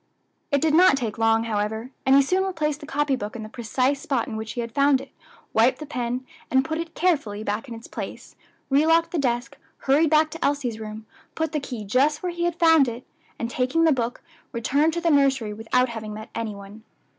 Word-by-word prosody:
It 285 Hz, -2 st, +1 dB
did 315 Hz, -1 st, +2 dB
not 350 Hz, -3 st, +6 dB
take 230 Hz, -4 st, -4 dB
long, 225 Hz, 0 st, +3 dB
however, 220 Hz, +2 st, -2 dB, 0.2 s
and 265 Hz, -, +6 dB
he 280 Hz, -, +6 dB
soon 370 Hz, +7 st, +1 dB
replaced 305 Hz, -6 st, -1 dB
the 295 Hz, -, -10 dB
copy 290 Hz, -1 st, +1 dB
book 210 Hz, -3 st, -6 dB
in 225 Hz, -, -6 dB
the 215 Hz, -, -8 dB
precise 255 Hz, +4 st, -1 dB
spot 265 Hz, -5 st, -1 dB
in -, -, -5 dB
which 220 Hz, 0 st, -5 dB
he 245 Hz, -, -3 dB
had 230 Hz, 0 st, -5 dB
found 280 Hz, -1 st, +4 dB
it, -, -, -11 dB, 0.4 s
wiped 230 Hz, +4 st, +4 dB
the 305 Hz, -, -7 dB
pen, 250 Hz, -3 st, -3 dB, 0.2 s
and 265 Hz, 0 st, +3 dB
put 315 Hz, 0 st, -3 dB
it 335 Hz, -1 st, -6 dB
carefully 275 Hz, -, 0 dB
back 210 Hz, +5 st, -3 dB
in 235 Hz, -, -7 dB
its 225 Hz, -, -11 dB
place, -, -, -8 dB, 0.4 s
relocked 325 Hz, +4 st, +4 dB
the 345 Hz, -, -1 dB
desk, 245 Hz, -2 st, -1 dB, 0.2 s
hurried 290 Hz, +4 st, +3 dB
back 310 Hz, 0 st, +3 dB
to 330 Hz, 0 st, -6 dB
Elsie's 265 Hz, -6 st, 0 dB
room, 215 Hz, 0 st, -7 dB, 0.3 s
put 320 Hz, -1 st, -1 dB
the 305 Hz, -, -1 dB
key 250 Hz, -6 st, -6 dB
just 275 Hz, -, +2 dB
where 360 Hz, -, -1 dB
he 345 Hz, 0 st, -2 dB
had 345 Hz, -1 st, -1 dB
found 325 Hz, -5 st, +5 dB
it, 240 Hz, +1 st, -6 dB, 0.3 s
and 230 Hz, 0 st, -4 dB
taking 260 Hz, +7 st, +1 dB
the 325 Hz, -, +5 dB
book, 245 Hz, -3 st, -2 dB, 0.3 s
returned 280 Hz, +7 st, +1 dB
to 340 Hz, -, -2 dB
the 335 Hz, -1 st, +2 dB
nursery 270 Hz, -7 st, +2 dB
without 230 Hz, +4 st, +1 dB
having 220 Hz, -2 st, -6 dB
met 215 Hz, +1 st, -9 dB
any 225 Hz, -2 st, -3 dB
one. 200 Hz, +2 st, -11 dB
265 Hz, 225 wpm, -24 LUFS, 225-305 Hz, 0.4 s, not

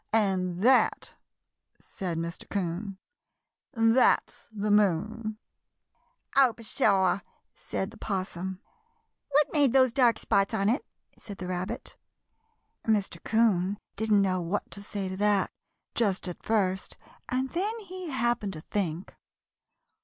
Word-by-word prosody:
"And 185 Hz, -4 st, +1 dB
that," 255 Hz, +1 st, +3 dB, 0.7 s
said 180 Hz, -4 st, -5 dB
Mr. 170 Hz, +1 st, -5 dB
'Coon, 190 Hz, +1 st, -3 dB, 0.7 s
"that's 225 Hz, 0 st, +2 dB
the 210 Hz, -1 st, -1 dB
moon!" 210 Hz, +3 st, +1 dB, 1.0 s
"Oh, 265 Hz, -3 st, +6 dB
pshaw!" 200 Hz, -4 st, +2 dB, 0.3 s
said 190 Hz, +2 st, -4 dB
the 225 Hz, -, -14 dB
'Possum. 190 Hz, -1 st, -3 dB, 0.7 s
"What 290 Hz, +1 st, +3 dB
made 285 Hz, -5 st, +4 dB
those 260 Hz, -3 st, +5 dB
dark 240 Hz, -4 st, +4 dB
spots 195 Hz, +3 st, +1 dB
on 200 Hz, -1 st, +2 dB
it?" 250 Hz, +7 st, +1 dB, 0.4 s
said 200 Hz, -3 st, -9 dB
the 185 Hz, -, -6 dB
Rabbit. 180 Hz, +1 st, -4 dB, 0.9 s
Mr. 210 Hz, -3 st, 0 dB
'Coon 205 Hz, -4 st, +2 dB, 0.2 s
didn't 210 Hz, -1 st, +3 dB
know 185 Hz, -2 st, +1 dB
what 175 Hz, +5 st, -3 dB
to 200 Hz, -, -8 dB
say 200 Hz, -1 st, -4 dB
to 185 Hz, 0 st, -5 dB
that 205 Hz, -1 st, +2 dB, 0.4 s
just 195 Hz, -5 st, 0 dB
at 180 Hz, -, -6 dB
first, 190 Hz, -4 st, 0 dB, 0.3 s
and 260 Hz, +1 st, -1 dB
then 410 Hz, +6 st, -1 dB
he 370 Hz, -3 st, -7 dB
happened 240 Hz, -6 st, 0 dB
to 155 Hz, -, -7 dB
think. 180 Hz, -2 st, -3 dB
205 Hz, 125 wpm, -28 LUFS, 190-230 Hz, 1.0 s, Oh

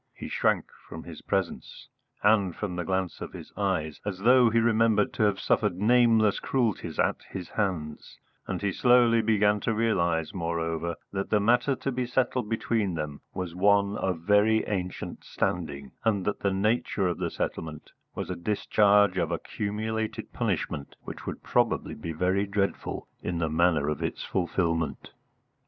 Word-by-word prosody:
He -, -, -7 dB
shrank -, -, +1 dB, 0.2 s
from -, -, -8 dB
his -, -, -10 dB
presence, -, -, -3 dB, 0.4 s
and 100 Hz, -4 st, +3 dB
from 100 Hz, -4 st, -4 dB
the 90 Hz, -, -2 dB
glance 95 Hz, +1 st, -2 dB
of -, -, -6 dB
his -, -, -10 dB
eyes, 90 Hz, -7 st, -1 dB
as 100 Hz, -2 st, -3 dB
though 120 Hz, +4 st, +5 dB
he 115 Hz, -, +1 dB
remembered 115 Hz, -2 st, +3 dB
to -, -, -3 dB
have 100 Hz, -2 st, +1 dB
suffered 105 Hz, -5 st, +1 dB
nameless 110 Hz, -1 st, +4 dB
cruelties 110 Hz, -, -1 dB
at -, -, +1 dB
his 90 Hz, -3 st, -6 dB
hands; 85 Hz, -8 st, -3 dB, 0.3 s
and -, -, -3 dB
he 100 Hz, -, +1 dB
slowly 120 Hz, 0 st, +4 dB
began 105 Hz, -1 st, +3 dB
to 115 Hz, +1 st, -1 dB
realise, 85 Hz, -8 st, +1 dB
moreover, 85 Hz, -1 st, -2 dB, 0.2 s
that 95 Hz, 0 st, -2 dB
the 105 Hz, -, +3 dB
matter 120 Hz, +6 st, +3 dB
to 135 Hz, -, -3 dB
be 125 Hz, -1 st, -2 dB
settled 125 Hz, -2 st, 0 dB
between 110 Hz, -4 st, 0 dB
them 75 Hz, -2 st, -5 dB
was 90 Hz, -2 st, -4 dB
one 100 Hz, +2 st, +3 dB
of 90 Hz, -5 st, -2 dB
very 105 Hz, +4 st, +3 dB
ancient 90 Hz, -3 st, -4 dB
standing, 70 Hz, -6 st, -3 dB
and 105 Hz, -5 st, +1 dB
that 105 Hz, -, -1 dB
the 100 Hz, -, +1 dB
nature 100 Hz, 0 st, +1 dB
of 90 Hz, -, -2 dB
the -, -, -1 dB
settlement 80 Hz, -2 st, -5 dB, 0.2 s
was -, -, -4 dB
a -, -, -2 dB
discharge 100 Hz, +1 st, +3 dB
of 85 Hz, -2 st, 0 dB
accumulated 110 Hz, +5 st, -3 dB
punishment 70 Hz, -, -2 dB
which -, -, -9 dB
would -, -, -5 dB
probably -, -, +1 dB
be 85 Hz, -, -6 dB
very 95 Hz, +5 st, 0 dB
dreadful 100 Hz, 0 st, -2 dB
in 90 Hz, -, -3 dB
the 80 Hz, -1 st, 0 dB
manner 80 Hz, -3 st, +2 dB
of 75 Hz, -, -2 dB
its -, -, -3 dB
fulfilment. 85 Hz, -3 st, -1 dB
100 Hz, 165 wpm, -27 LUFS, 85-110 Hz, 0.4 s, though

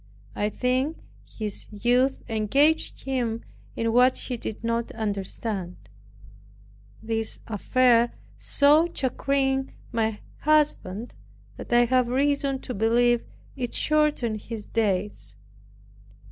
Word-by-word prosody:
I 210 Hz, -, 0 dB
think 255 Hz, +7 st, 0 dB, 0.3 s
his 210 Hz, -2 st, -6 dB
youth 245 Hz, +5 st, +1 dB
engaged 270 Hz, +8 st, +1 dB
him 240 Hz, -4 st, -2 dB, 0.3 s
in 230 Hz, 0 st, 0 dB
what 250 Hz, +2 st, +5 dB
he 250 Hz, -, -4 dB
did 225 Hz, -1 st, -6 dB
not 230 Hz, 0 st, -1 dB
understand. 200 Hz, -3 st, -3 dB, 1.3 s
This 225 Hz, 0 st, -2 dB
affair 235 Hz, +2 st, +3 dB, 0.3 s
so 295 Hz, +4 st, +4 dB
chagrined 270 Hz, -1 st, 0 dB, 0.2 s
my 220 Hz, -2 st, -1 dB, 0.2 s
husband, 265 Hz, -8 st, +1 dB, 0.4 s
that -, -, -9 dB
I 240 Hz, 0 st, +5 dB
have 255 Hz, 0 st, +2 dB
reason 275 Hz, +1 st, +1 dB
to 250 Hz, -, -5 dB
believe 235 Hz, +2 st, +3 dB, 0.3 s
it 245 Hz, -3 st, -3 dB
shortened 295 Hz, -8 st, +1 dB
his 225 Hz, -3 st, -6 dB
days. 190 Hz, -, -1 dB
240 Hz, 105 wpm, -25 LUFS, 220-265 Hz, 1.3 s, what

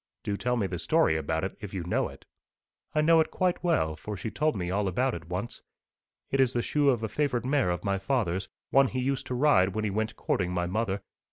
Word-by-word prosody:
'Do 100 Hz, -, -1 dB
tell 125 Hz, +4 st, 0 dB
me 105 Hz, -, +1 dB
the 90 Hz, -2 st, -3 dB
story 80 Hz, -, +3 dB
about 80 Hz, +1 st, -1 dB
it, 95 Hz, -, -3 dB
if 100 Hz, -2 st, -7 dB
you 90 Hz, -, -2 dB
know 90 Hz, -, 0 dB
it.' -, -, -13 dB, 0.7 s
'I 155 Hz, -, +4 dB
know 165 Hz, +1 st, +5 dB
it 160 Hz, -, +2 dB
quite 185 Hz, -1 st, 0 dB
well, 120 Hz, -, +1 dB
for 105 Hz, +6 st, -6 dB
she 110 Hz, -, -4 dB
told 155 Hz, -3 st, +1 dB
me 90 Hz, -2 st, -2 dB
all 100 Hz, +1 st, 0 dB
about 125 Hz, +8 st, +1 dB
it 85 Hz, 0 st, -7 dB
once. 100 Hz, +7 st, -4 dB, 0.7 s
It 135 Hz, -, +1 dB
is 130 Hz, -2 st, +4 dB
the 120 Hz, -, 0 dB
shoe 145 Hz, -2 st, +2 dB
of 120 Hz, -4 st, +1 dB
a -, -, 0 dB
favourite 125 Hz, -2 st, -1 dB
mare 135 Hz, -6 st, +2 dB
of 90 Hz, 0 st, -2 dB
my 100 Hz, -1 st, 0 dB
father's 95 Hz, -4 st, -1 dB, 0.2 s
one 135 Hz, 0 st, +6 dB
he 130 Hz, -, -3 dB
used 135 Hz, +1 st, -1 dB
to 125 Hz, -, -2 dB
ride 120 Hz, -9 st, +4 dB
when 110 Hz, -, -1 dB
he 105 Hz, -, 0 dB
went 110 Hz, +2 st, -2 dB
courting 90 Hz, -2 st, -1 dB
my 90 Hz, -1 st, 0 dB
mother. 100 Hz, +1 st, -1 dB
110 Hz, 245 wpm, -28 LUFS, 95-130 Hz, 0.7 s, one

